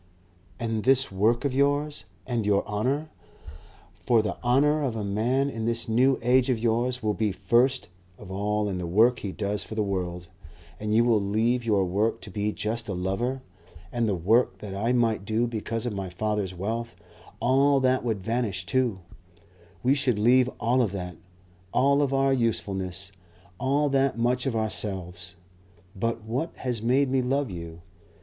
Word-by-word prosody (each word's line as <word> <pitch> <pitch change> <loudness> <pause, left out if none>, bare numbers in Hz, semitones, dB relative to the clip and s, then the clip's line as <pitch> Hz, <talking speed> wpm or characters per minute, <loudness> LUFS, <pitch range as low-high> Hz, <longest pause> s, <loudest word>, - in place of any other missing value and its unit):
"And 115 -2 -2
this 135 -1 +3
work 110 +7 +1
of 140 - 0
yours? 145 +2 0 0.2
And 120 -3 -1
your 100 -1 +2
honour? 130 +9 -1 0.8
For 115 -3 +2
the 100 -5 -2
honour 145 +5 +3
of 130 -5 -1
a 110 - -3
man 115 +7 +1
in 115 -5 -4
this 115 0 0
New 125 +4 +3
Age 125 +2 +3
of 125 - +2
yours 120 +2 0
will 105 -1 +1
be 105 -1 0
first 125 +4 +1 0.3
of 90 - -11
all 105 +2 -1
in 95 -2 -3
the 90 - -3
work 115 +8 +4
he 100 - -4
does 100 0 -2
for 110 - -8
the 110 - +1
world. 90 -3 -3 0.5
And 105 0 -1
you 115 - +5
will 115 -3 +3
leave 110 +5 +1
your 105 -4 +2
work 100 +5 0
to 100 - -8
be 105 +2 -1
just 110 +2 -3
a 100 - -2
lover. 115 +9 -2 0.5
And 120 -2 0
the 100 - +1
work 110 +9 +2
that 100 -2 -7
I 110 +5 0
might 115 -5 +1
do 110 +3 0
because 115 0 -3
of 120 - -2
my 95 -2 -4
father's 100 0 -2
wealth; 115 +5 -3 0.4
all 135 +3 +3
that 130 0 +2
would 110 -5 -1
vanish 110 -4 -1
too. 115 -1 0 0.8
We 130 +2 +4
should 135 -5 +1
leave 125 +4 +4
all 125 +2 +2
of 105 -5 0
that, 90 -2 -5 0.6
all 140 +2 +3
of 140 -2 +1
our 135 0 +2
usefulness, 95 -6 -2 0.5
all 140 +3 +1
that 135 -2 +1
much 125 +3 +1
of 125 - -1
ourselves. 95 -5 -3 0.6
But 115 +3 -2
what 125 +9 -3
has 120 -4 -3
made 130 +3 +2
me 135 -1 +2
love 135 -1 0
you? 85 -1 -8
115 Hz, 175 wpm, -26 LUFS, 100-125 Hz, 0.8 s, you